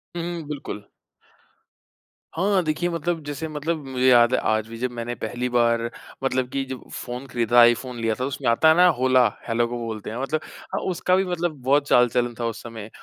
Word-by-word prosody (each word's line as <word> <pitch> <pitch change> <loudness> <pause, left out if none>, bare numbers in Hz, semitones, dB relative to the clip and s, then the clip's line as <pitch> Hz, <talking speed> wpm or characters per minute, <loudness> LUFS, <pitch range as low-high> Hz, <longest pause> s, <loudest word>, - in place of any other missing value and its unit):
हुँ, 170 - -2
हुँ, 165 - -6
बिल्कुल। 135 -8 -7 1.5
हाँ, 190 +3 +2
देखिए 155 +2 -1
मतलब 170 0 -2
जैसे 145 +2 -4
मतलब 155 0 -3
मुझे 130 -1 0
याद 120 0 +6
है - - +3
आज 110 0 +1
भी 115 - -8
जब 125 +2 -2
मैंने 120 0 -4
पहली 120 +3 -2
बार, 115 -1 +2 0.4
मतलब 130 -1 0
कि 135 0 -2
जब 130 -1 -6
फ़ोन 125 +2 -6
खरीदा 120 -1 -1
था - - +9
आईफ़ोन 120 +1 +3
लिया 115 -1 0
था - - -8
तो 130 - -1
उसमें 135 -1 -4
आता 115 +7 +4
है 160 - +6
ना 180 - +7
होला 130 -1 +4 0.2
हेलो 120 0 +1
को 120 +1 -4
बोलते 110 -2 -5
हैं 110 - -5
मतलब, 155 +3 -1 0.3
हाँ - - -1
उसका 180 +1 +1
भी 190 +1 +2
मतलब 175 -3 -2
बहुत 140 +3 +2
चाल-चलन 120 -1 +3
था 120 - -1
उस 115 -1 -4
समय। 115 -2 -8
125 Hz, 210 wpm, -23 LUFS, 120-150 Hz, 1.5 s, था